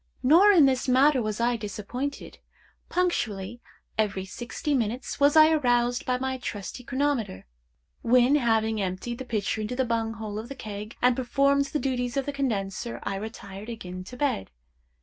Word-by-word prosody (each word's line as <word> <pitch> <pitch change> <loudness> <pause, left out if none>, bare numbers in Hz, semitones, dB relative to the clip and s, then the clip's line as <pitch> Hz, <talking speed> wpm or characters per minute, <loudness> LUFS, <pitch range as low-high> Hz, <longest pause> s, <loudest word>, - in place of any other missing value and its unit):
Nor 340 +10 +7
in 335 -8 +7
this 260 -1 +1
matter 260 +1 +4
was 215 -1 -3
I 240 +1 +2
disappointed. 225 +7 -5 0.5
Punctually 235 - -1 0.4
every 200 -3 0
sixty 240 +8 -4
minutes 245 0 -2
was 285 +2 +4
I 310 0 +8
aroused 245 -5 +1
by 250 0 +1
my 260 0 -3
trusty 210 +1 -6
chronometer, 260 - -1 0.6
when, 250 +3 +4
having 225 -5 +2
emptied 195 +6 -3
the 260 - -5
pitcher 215 -2 -1
into 215 +4 -3
the 260 0 +1
bung 225 -1 -1
hole 215 -2 -5
of 225 +3 -8
the 275 - -6
keg, 215 -2 -7
and 250 0 +5
performed 275 +2 +2
the 280 +2 -2
duties 250 -2 -2
of 270 - 0
the 285 - -3
condenser, 235 -4 -2
I - - -2
retired 200 0 -7
again 185 -5 -7
to 250 - -10
bed. 245 - -1
240 Hz, 170 wpm, -26 LUFS, 215-270 Hz, 0.6 s, I